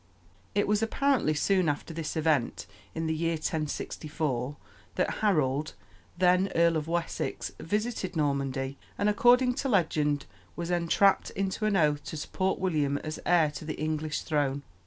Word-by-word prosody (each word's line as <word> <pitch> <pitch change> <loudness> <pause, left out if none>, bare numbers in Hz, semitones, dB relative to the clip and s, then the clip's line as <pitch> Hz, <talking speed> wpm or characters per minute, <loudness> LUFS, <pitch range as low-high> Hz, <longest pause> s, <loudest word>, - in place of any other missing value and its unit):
It 205 - +2
was 210 +1 +2
apparently 240 - +1
soon 185 +1 +2
after 145 +3 -3
this 165 0 -4
event, 150 -10 +1 0.3
in 160 0 -2
the 160 - 0
year 165 +1 0
1064, 150 -3 -3 0.4
that - - 0
Harold, 150 -8 +1 0.4
then 180 +1 +4
Earl 170 0 +4
of 155 -1 -2
Wessex, 170 0 -2
visited 210 0 -2
Normandy, 140 -2 -1 0.2
and, 205 - +1
according 250 +4 +5
to 270 +2 -2
legend, 150 - +1 0.3
was 170 0 -4
entrapped 175 +3 +3
into 195 +2 -2
an 205 -2 +2
oath 150 -3 +2
to 160 - -5
support 190 +5 -1
William 150 -6 0
as 155 0 -5
heir 165 -4 +4
to 145 - -8
the 155 0 -5
English 155 0 -2
throne. 145 -2 0
160 Hz, 150 wpm, -29 LUFS, 150-190 Hz, 0.4 s, according